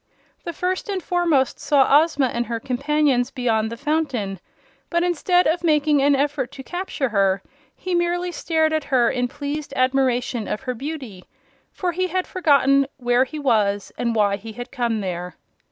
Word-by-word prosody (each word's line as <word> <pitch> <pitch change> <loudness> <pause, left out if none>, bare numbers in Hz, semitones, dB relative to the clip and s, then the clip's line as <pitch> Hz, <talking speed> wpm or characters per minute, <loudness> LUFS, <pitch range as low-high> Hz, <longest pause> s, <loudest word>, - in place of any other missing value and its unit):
The 340 - -3
First 370 +6 -2
and 390 -2 -1
Foremost 335 -7 +1
saw 285 0 +5
Ozma 310 -4 0
and 240 0 -2
her 230 -1 -3
companions 270 0 +1
beyond 230 -5 0
the 230 - -6
fountain, 270 - -2 0.5
but 340 0 +1
instead 355 +1 +2
of 335 +3 +1
making 300 -3 +3
an 285 +1 +4
effort 280 -2 -1
to 265 - -9
capture 350 -5 -3
her 195 -3 +1 0.3
he 370 - -4
merely 350 +1 0
stared 320 -2 0
at 310 -2 -1
her 245 -3 +2
in 250 0 -1
pleased 285 +3 -5
admiration 255 -3 +1
of - - -3
her 255 -1 -3
beauty 255 -7 -7 0.5
for 360 -2 -2
he 370 +2 -1
had 370 +1 -1
forgotten 275 -5 +3
where 245 0 +2
he 305 +4 -8
was 210 -8 +1
and 235 -1 -1
why 205 -2 +2
he 220 +2 -9
had 245 +2 -8
come 235 -5 -1
there. 180 -1 -5
275 Hz, 170 wpm, -22 LUFS, 240-315 Hz, 0.5 s, saw